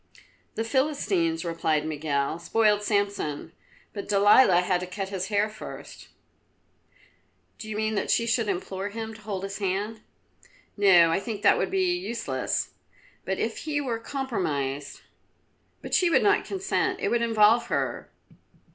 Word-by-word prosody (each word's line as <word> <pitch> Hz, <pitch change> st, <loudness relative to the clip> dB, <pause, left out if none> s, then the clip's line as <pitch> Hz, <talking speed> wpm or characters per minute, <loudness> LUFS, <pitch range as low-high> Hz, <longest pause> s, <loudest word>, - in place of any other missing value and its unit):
"The 225 Hz, -, -1 dB
Philistines," 205 Hz, -, 0 dB
replied 160 Hz, -2 st, 0 dB
Miguel, 150 Hz, 0 st, -2 dB
"spoiled 210 Hz, +3 st, +2 dB
Samson, 200 Hz, -8 st, -1 dB, 0.4 s
but 200 Hz, -, -7 dB
Delilah 200 Hz, -2 st, +6 dB
had 180 Hz, 0 st, +1 dB
to 180 Hz, -, -6 dB
cut 195 Hz, +1 st, -5 dB
his 190 Hz, -1 st, -3 dB
hair 205 Hz, 0 st, +1 dB
first." 215 Hz, -, -10 dB, 1.5 s
"Do 215 Hz, -, -8 dB
you 215 Hz, -, -4 dB
mean 215 Hz, 0 st, 0 dB
that 205 Hz, -, -2 dB
she 230 Hz, -, +2 dB
should 230 Hz, -1 st, +1 dB
implore 190 Hz, +1 st, -3 dB
him 220 Hz, +1 st, -6 dB
to 215 Hz, -, -13 dB
hold 200 Hz, -3 st, -5 dB
his 195 Hz, +1 st, -5 dB
hand?" 205 Hz, +3 st, -2 dB, 0.7 s
"No, 180 Hz, -5 st, +6 dB
I 165 Hz, -, +1 dB
think 210 Hz, 0 st, -6 dB
that -, -, +5 dB
would -, -, 0 dB
be 370 Hz, -2 st, +1 dB
useless, 230 Hz, -, -3 dB, 0.5 s
but 190 Hz, 0 st, -2 dB
if 225 Hz, 0 st, -2 dB
he 300 Hz, -2 st, -2 dB
were 245 Hz, -5 st, -2 dB
compromised 155 Hz, -, -3 dB, 0.4 s
" -, -, -43 dB
"But -, -, -7 dB
she, 360 Hz, -, +4 dB
she -, -, +2 dB
would 330 Hz, -, +3 dB
not 405 Hz, 0 st, +3 dB
consent. 380 Hz, -1 st, -1 dB
It -, -, -1 dB
would 235 Hz, -, +1 dB
involve 230 Hz, +1 st, +4 dB
her." -, -, -2 dB
205 Hz, 155 wpm, -26 LUFS, 180-230 Hz, 1.5 s, Delilah